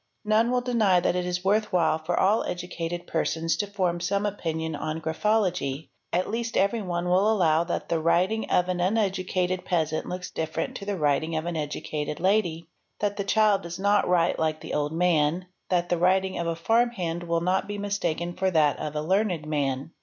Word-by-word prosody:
None 215 Hz, +2 st, +3 dB
will 250 Hz, 0 st, +1 dB
deny 225 Hz, -7 st, +3 dB
that 175 Hz, -, 0 dB
it 180 Hz, 0 st, -1 dB
is 180 Hz, +1 st, -3 dB
worth 210 Hz, +2 st, +2 dB
while 170 Hz, -3 st, +2 dB
for 165 Hz, +2 st, -1 dB
all 210 Hz, +4 st, +3 dB
educate 175 Hz, -1 st, -4 dB
persons 165 Hz, 0 st, 0 dB
to 205 Hz, -, -1 dB
form 185 Hz, -4 st, -1 dB
some 200 Hz, +4 st, 0 dB
opinion 160 Hz, -5 st, -3 dB
on 155 Hz, +2 st, -3 dB
graphology. 165 Hz, -4 st, 0 dB, 0.2 s
At 180 Hz, +2 st, 0 dB
least 230 Hz, +1 st, -2 dB
everyone 190 Hz, -4 st, 0 dB
wi 180 Hz, +1 st, +2 dB
allow 170 Hz, -7 st, +3 dB
that 170 Hz, -, -3 dB
the 165 Hz, -, +1 dB
writing 185 Hz, +7 st, +1 dB
of 180 Hz, -, +2 dB
an 180 Hz, -1 st, -1 dB
uneducated 185 Hz, -2 st, 0 dB
peasant 160 Hz, -3 st, -1 dB
looks 180 Hz, 0 st, -5 dB
different 160 Hz, 0 st, -3 dB
to 200 Hz, -, -8 dB
th 200 Hz, -2 st, -1 dB
writing 155 Hz, +1 st, +1 dB
of 160 Hz, +1 st, -2 dB
an 175 Hz, -1 st, -3 dB
educated 150 Hz, 0 st, -4 dB
lady, 175 Hz, -4 st, +1 dB, 0.3 s
that 205 Hz, -1 st, -1 dB
the 200 Hz, -, -1 dB
child 210 Hz, 0 st, +3 dB
does 170 Hz, 0 st, -7 dB
not 200 Hz, +1 st, +2 dB
write 175 Hz, -2 st, +2 dB
lke 155 Hz, -1 st, -1 dB
the -, -, -7 dB
ol 145 Hz, 0 st, 0 dB
man, 165 Hz, 0 st, +1 dB, 0.2 s
that 175 Hz, -1 st, +1 dB
the 175 Hz, -, +1 dB
writing 190 Hz, +2 st, +2 dB
of 170 Hz, -, -2 dB
a 165 Hz, -, -1 dB
farmhand 185 Hz, -3 st, 0 dB
will 170 Hz, -1 st, 0 dB
not 185 Hz, +2 st, 0 dB
be 205 Hz, 0 st, -4 dB
mistaken 175 Hz, -4 st, -2 dB
for 190 Hz, +1 st, 0 dB
that 155 Hz, -5 st, +3 dB
| -, -, -13 dB, 0.2 s
a 150 Hz, -, -1 dB
learned 185 Hz, -2 st, 0 dB
man. 140 Hz, -1 st, -2 dB
180 Hz, 195 wpm, -26 LUFS, 160-200 Hz, 0.3 s, None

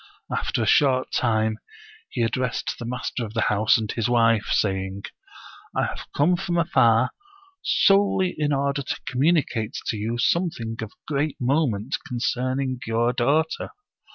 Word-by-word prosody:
After -, -, -1 dB
a -, -, 0 dB
short 130 Hz, -3 st, +3 dB
time, 110 Hz, -2 st, +1 dB, 0.5 s
he 120 Hz, -, -1 dB
addressed 125 Hz, +2 st, -2 dB
the 120 Hz, -, -5 dB
master 125 Hz, 0 st, -3 dB
of 110 Hz, -1 st, -7 dB
the -, -, +1 dB
house 110 Hz, +2 st, +4 dB
and 110 Hz, -2 st, -3 dB
his 115 Hz, 0 st, -1 dB
wife, 115 Hz, -3 st, +3 dB
saying: 95 Hz, -1 st, -1 dB, 0.4 s
" -, -, -18 dB
I -, -, +1 dB
have -, -, -6 dB
come 160 Hz, +6 st, +3 dB
from 175 Hz, -2 st, -2 dB
afar 125 Hz, -7 st, +3 dB, 0.5 s
solely 195 Hz, -2 st, +3 dB
in 150 Hz, -1 st, 0 dB
order 140 Hz, 0 st, 0 dB
to 140 Hz, -, -4 dB
communicate 130 Hz, -5 st, +1 dB
to 110 Hz, -, -2 dB
you 115 Hz, +3 st, -2 dB
something 120 Hz, -5 st, 0 dB
of 110 Hz, -1 st, -6 dB, 0.2 s
great 145 Hz, 0 st, -1 dB
moment 130 Hz, -3 st, 0 dB
concerning 130 Hz, +1 st, -1 dB
your 115 Hz, +2 st, +1 dB
daughter. 145 Hz, +7 st, 0 dB
125 Hz, 150 wpm, -24 LUFS, 115-145 Hz, 0.5 s, house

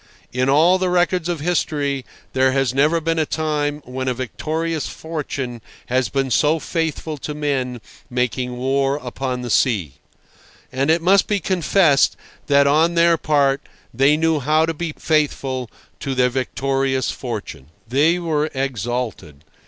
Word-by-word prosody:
In 130 Hz, +1 st, +1 dB
all 165 Hz, +7 st, +5 dB
the 185 Hz, -1 st, 0 dB
records 180 Hz, -1 st, +1 dB
of 170 Hz, -4 st, -2 dB
history 145 Hz, -5 st, -1 dB, 0.3 s
there 130 Hz, 0 st, +3 dB
has 135 Hz, -2 st, +1 dB
never 150 Hz, +5 st, +3 dB
been 165 Hz, 0 st, -1 dB
a 155 Hz, -, +2 dB
time 150 Hz, -1 st, -1 dB
when 130 Hz, +1 st, -4 dB
a 130 Hz, -, 0 dB
victorious 155 Hz, +5 st, -3 dB
fortune 140 Hz, -7 st, -5 dB, 0.3 s
has 130 Hz, 0 st, +1 dB
been 135 Hz, -2 st, -1 dB
so 150 Hz, +6 st, +3 dB
faithful 160 Hz, -2 st, -3 dB
to 150 Hz, +2 st, -5 dB
men 135 Hz, -5 st, -2 dB, 0.3 s
making 125 Hz, 0 st, -2 dB
war 135 Hz, +2 st, +1 dB
upon 125 Hz, -2 st, -4 dB
the 120 Hz, -, -4 dB
sea. 90 Hz, -, +1 dB, 0.7 s
And 135 Hz, +3 st, 0 dB
it 165 Hz, +1 st, +3 dB
must 195 Hz, +2 st, +4 dB
be 205 Hz, -1 st, +1 dB
confessed 170 Hz, -4 st, +3 dB, 0.3 s
that 140 Hz, -1 st, +5 dB
on 160 Hz, +4 st, +3 dB
their 170 Hz, 0 st, +5 dB
part 140 Hz, -3 st, +2 dB, 0.3 s
they 135 Hz, +5 st, +4 dB
knew 160 Hz, -1 st, +2 dB
how 155 Hz, +4 st, +2 dB
to 165 Hz, -, -2 dB
be 160 Hz, 0 st, -4 dB
faithful 135 Hz, -5 st, 0 dB, 0.3 s
to 135 Hz, -1 st, -3 dB
their 125 Hz, 0 st, +3 dB
victorious 135 Hz, +1 st, -1 dB
fortune. 110 Hz, -, -6 dB, 0.2 s
They 145 Hz, +8 st, +3 dB
were 155 Hz, -3 st, -1 dB
exalted. 120 Hz, -, -3 dB
140 Hz, 150 wpm, -20 LUFS, 130-160 Hz, 0.7 s, all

